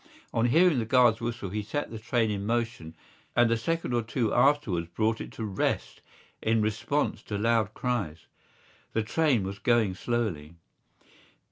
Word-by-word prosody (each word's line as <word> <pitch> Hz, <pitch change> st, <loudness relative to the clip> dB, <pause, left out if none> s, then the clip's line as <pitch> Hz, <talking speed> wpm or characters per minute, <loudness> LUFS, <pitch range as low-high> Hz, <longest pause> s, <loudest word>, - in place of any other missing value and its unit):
On 115 Hz, +1 st, +2 dB
hearing 165 Hz, +2 st, +4 dB
the 115 Hz, -, -1 dB
guard's 120 Hz, -1 st, +4 dB
whistle 115 Hz, -4 st, -3 dB
he 105 Hz, +1 st, -2 dB
set 130 Hz, +7 st, -4 dB
the 115 Hz, -, -6 dB
train 115 Hz, -1 st, 0 dB
in 100 Hz, -1 st, -3 dB
motion 115 Hz, -7 st, -2 dB, 0.4 s
and 120 Hz, -1 st, +4 dB
a -, -, +4 dB
second 165 Hz, +4 st, -2 dB
or 120 Hz, -, +2 dB
two 115 Hz, 0 st, -1 dB
afterwards 110 Hz, -, +2 dB
brought 110 Hz, +6 st, 0 dB
it -, -, -7 dB
to 110 Hz, -, -5 dB
rest 100 Hz, -3 st, -2 dB, 0.4 s
in 110 Hz, 0 st, +2 dB
response 110 Hz, +7 st, -1 dB
to 105 Hz, -, -4 dB
loud 110 Hz, 0 st, +1 dB
cries. 100 Hz, -11 st, -2 dB, 0.7 s
The 110 Hz, -, +1 dB
train 135 Hz, -2 st, +2 dB
was 100 Hz, +1 st, -5 dB
going 115 Hz, -3 st, +2 dB
slowly. 90 Hz, -8 st, -2 dB
115 Hz, 160 wpm, -28 LUFS, 105-120 Hz, 0.7 s, hearing